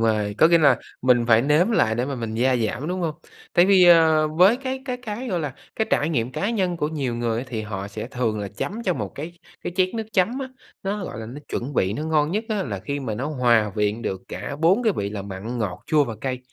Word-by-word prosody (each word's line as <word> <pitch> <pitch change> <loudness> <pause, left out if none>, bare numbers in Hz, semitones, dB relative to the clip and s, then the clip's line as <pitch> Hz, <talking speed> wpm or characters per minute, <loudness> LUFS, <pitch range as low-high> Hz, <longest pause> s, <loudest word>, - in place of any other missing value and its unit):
rồi, 105 -2 +1
có 160 - +7
nghĩa 170 0 +5
là 140 -5 +5 0.3
mình 125 -2 +4
phải 115 0 +6
nếm 150 - +3
lại 110 - +2
để 120 +2 0
mà 140 +1 -3
mình 115 -3 -4
gia 125 +2 +2
giảm, 120 +6 -2
đúng 185 +1 -2
hông? 160 -3 -1 0.4
Tại 175 - +5
vì, 190 -2 +6
ờ, 160 -3 +6
với 180 +9 +5
cái 265 0 -4
cái 250 -2 -3
cái, 245 +1 -6
gọi 180 -4 -1
là, 145 -4 -4 0.2
cái 220 - 0
trải 150 - +2
nghiệm 125 -5 -1
cá 200 - -1
nhân 185 -6 0
của 150 -3 -1
nhiều 140 -6 -2
người 115 -1 -1
á, 125 - -3
thì 110 -3 -3
họ 100 -2 -5
sẽ 110 +2 -6
thường 120 -4 -2
là 100 -1 -4
chấm 215 - -5
cho 185 -5 0
một - - -3
cái 170 +4 -7 0.3
cái - - -3
chén 185 -1 +3
nước 225 - -2
chấm 205 +8 +2
á, 265 -1 -4 0.3
nó 195 0 -2
gọi - - -6
là 110 - -6
nó 125 +6 -8
chuẩn 135 +3 -4
vị, 95 -2 +1
nó 150 - -4
ngon 155 -1 +1
nhất 215 +4 -1
á, 210 -3 0
là 105 - -4
khi 140 +7 -4
mà 115 -6 -3
nó 130 +7 -3
hòa 120 -7 +2
quyện 105 +2 0
được 95 -1 -3
cả 140 - -5
4 185 +9 +4
cái 220 -3 +3
vị 100 0 -2
là 105 -1 -5
mặn, 100 +5 -6
ngọt, 100 -5 -3
chua 150 -2 +3
và 115 -4 -5
cay. 130 -2 -2
140 Hz, 270 wpm, -23 LUFS, 115-180 Hz, 0.4 s, có